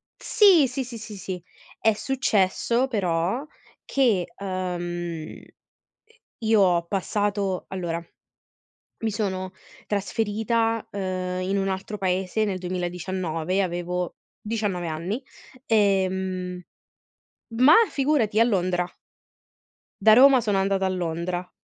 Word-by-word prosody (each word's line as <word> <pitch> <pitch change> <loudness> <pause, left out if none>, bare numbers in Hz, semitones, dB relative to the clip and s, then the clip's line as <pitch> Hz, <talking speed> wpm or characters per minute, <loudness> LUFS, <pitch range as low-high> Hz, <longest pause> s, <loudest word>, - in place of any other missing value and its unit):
sì, 390 - +5
sì, 260 +2 -3
sì, 240 -1 -8
sì, 215 -1 -8
sì. 185 -2 -6 0.4
È 220 - +3
successo 235 -1 +1
però 195 - -1 0.4
che 230 -10 +2
ehm, 175 -4 -4
i - - -18 0.9
io 220 -1 +4
ho 175 -3 +3
passato, 200 0 -1
allora 170 -3 -3 1.0
mi 220 - +1
sono 190 -3 -2 0.3
trasferita, 225 +2 0
ehm, 185 -2 -3
in 190 +2 -1
un 195 - 0
altro 195 +2 -3
paese 190 +3 0
nel 195 -3 -2
2019, 180 -1 -2
avevo 180 -1 -2 0.3
19 210 -5 -2
anni, 175 - -3 0.4
ehm 190 -3 +1 0.9
ma, 255 +7 +6
figurati! 270 -7 +1
A - - +8
Londra. 185 -5 +1 1.2
Da 220 - +7
Roma 265 +1 +7
sono 210 -3 0
andata 195 0 +1
a - - +1
Londra. 175 0 -3
190 Hz, 110 wpm, -25 LUFS, 180-220 Hz, 1.2 s, A